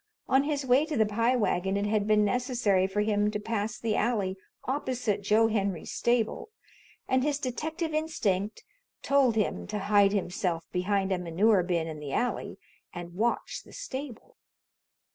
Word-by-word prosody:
On 270 +1 +3
his 290 -2 -1
way 255 +3 +4
to 310 - -2
the 220 - +4
Pie 230 +4 +1
Wagon 195 -4 0
it 200 - 0
had 210 0 0
been 210 -1 +4
necessary 235 -5 +1
for 200 +2 -1
him 210 0 +2
to 210 0 -3
pass 215 0 -2
the 225 -2 -1
alley 205 -5 0 0.3
opposite 250 -6 -1
Joe 215 +3 +4
Henry's 200 -6 -2
stable 240 - 0 0.6
and 260 0 +2
his 290 +1 0
detective 315 +5 -3
instinct 215 -11 -1 0.4
told 275 -4 +3
him 210 -2 -1
to 210 - -3
hide 205 0 +4
himself 180 -4 -1
behind 195 +1 0
a 185 - +1
manure 185 +4 +3
bin 170 -2 0
in 160 -2 -6
the 145 -2 -6
alley 245 +1 -1 0.3
and 175 -1 -8
watch 230 +6 -1
the - - -16
stable. 280 - -7
210 Hz, 160 wpm, -28 LUFS, 195-250 Hz, 0.6 s, way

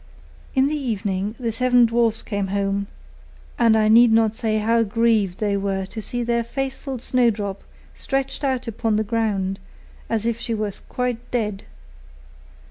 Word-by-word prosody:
In 265 0 +4
the 305 - -1
evening 210 -6 -2
the 235 -2 -1
seven 245 +1 +4
dwarfs 230 -1 +1
came 200 -2 -2
home; 200 0 -1 0.7
and 230 -2 +5
I 215 -1 +3
need 230 +2 +7
not 225 -1 +4
say 220 -1 -1
how 230 +2 +2
grieved 220 -3 +1
they 205 -2 0
were 195 -1 -1
to 220 +3 -7
see 245 +3 -3
their 235 0 +1
faithful 270 +2 -4
Snowdrop 220 -5 0 0.3
stretched 270 +1 -3
out 260 -3 -1
upon 225 -1 -1
the 215 - +1
ground, 205 -4 -1 0.5
as 225 -1 -1
if 235 -1 0
she 230 -1 -2
was 210 -2 -3
quite 245 -1 -3
dead. 210 -5 -2
225 Hz, 155 wpm, -22 LUFS, 205-240 Hz, 0.7 s, need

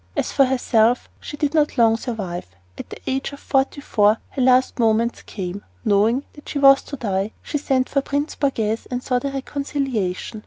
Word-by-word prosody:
As - - 0
for 275 - +4
herself, 245 -2 +2
she 295 - -8
did 295 0 0
not 300 -3 +1
long 225 -2 +5
survive. 205 - -5 0.3
At - - -9
the - - -8
age 265 +1 -2
of 280 - -9
forty 270 +1 0
four 210 -4 +3
her 270 - -3
last 255 0 +3
moments 230 +1 +2
came. 190 0 -6 0.2
Knowing 220 +7 +2
that 295 - -13
she - - -3
was 275 -1 +7
to 285 - -6
die, 200 -4 -2
she 295 - -2
sent 260 -2 +1
for 275 - 0
Prince 285 +2 -2
Borghese 225 -6 -1
and 250 0 -3
sought 250 0 -1
a - - 0
reconciliation. 270 -8 -3
255 Hz, 190 wpm, -22 LUFS, 220-275 Hz, 0.3 s, was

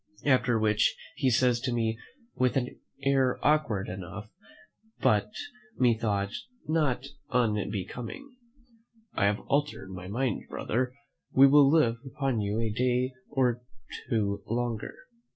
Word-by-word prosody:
After 125 -4 +3
which 110 -1 +2 0.2
he 130 - +2
says 125 0 +3
to 130 +1 -2
me, 115 -1 0 0.3
with 130 +1 +1
an 125 -1 -3 0.2
air 135 -2 +3
awkward 145 -10 +2
enough, 95 +3 -7 0.7
but 105 -1 +3 0.5
methought 110 -5 +1 0.4
not 150 -5 +1 0.2
unbecoming, 115 - -2 0.8
"I 100 - +1
have 105 +1 +1
altered 145 -8 -1
my 90 -1 -7
mind, 120 +3 -2
brother; 125 +2 -2 0.4
we 135 - +8
will 140 0 +7
live 140 -7 +3
upon 135 -4 -1
you 105 +2 -1
a 115 -2 0
day 125 +2 +1 0.2
or 125 -4 +1 0.5
two 100 -4 0
longer." 115 -1 -2
120 Hz, 120 wpm, -29 LUFS, 105-130 Hz, 0.8 s, we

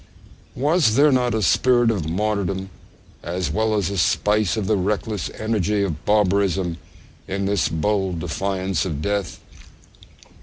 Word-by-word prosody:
Was 145 -4 +2
there 145 +3 +5
not 125 -3 +1
a 110 - 0
spirit 120 +4 +3
of 85 -8 -3
martyrdom 95 0 -2 0.5
as 85 -3 -3
well 110 +6 0
as 100 -1 0
a 100 - -2
spice 105 +3 +1
of 105 - -1
the 110 - +2
reckless 105 +1 -2
energy 105 -2 0
of 80 -6 -4
barbarism 95 -4 +1 0.5
in 95 +1 -2
this 100 -6 +1
bold 95 +2 -1
defiance 95 +1 -2
of 80 -7 -3
death? 100 -2 -2
100 Hz, 140 wpm, -22 LUFS, 90-110 Hz, 0.5 s, there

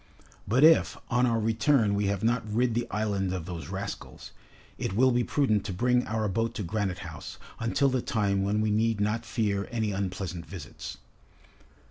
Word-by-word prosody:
But, 125 +7 +3
if 160 +1 +6
on 125 +1 +3
our 115 -1 +1
return 115 0 +2
we 100 0 +1
have 100 0 -1
not 120 +1 +2
rid 120 +2 +2
the 120 +1 -1
island 100 -3 -1
of 90 -4 -4
those 85 -2 -6
rascals, 95 +2 -6 0.5
it - - -2
will 130 +4 +5
be 120 0 +2
prudent 110 -7 +1
to 95 - -3
bring 125 +5 +2
our 110 0 0
boat 115 +4 -1
to 105 - -3
Granite 95 0 -1
House, 80 -2 -8 0.2
until 115 +5 +2
the 130 -1 0
time 100 -5 0
when 100 +2 +1
we 110 -1 +1
need 110 0 +1
not 110 +3 -1
fear 100 -3 -1
any 110 -3 -1
unpleasant 95 -3 -4
visits." 95 -6 -8
110 Hz, 180 wpm, -28 LUFS, 100-120 Hz, 0.5 s, if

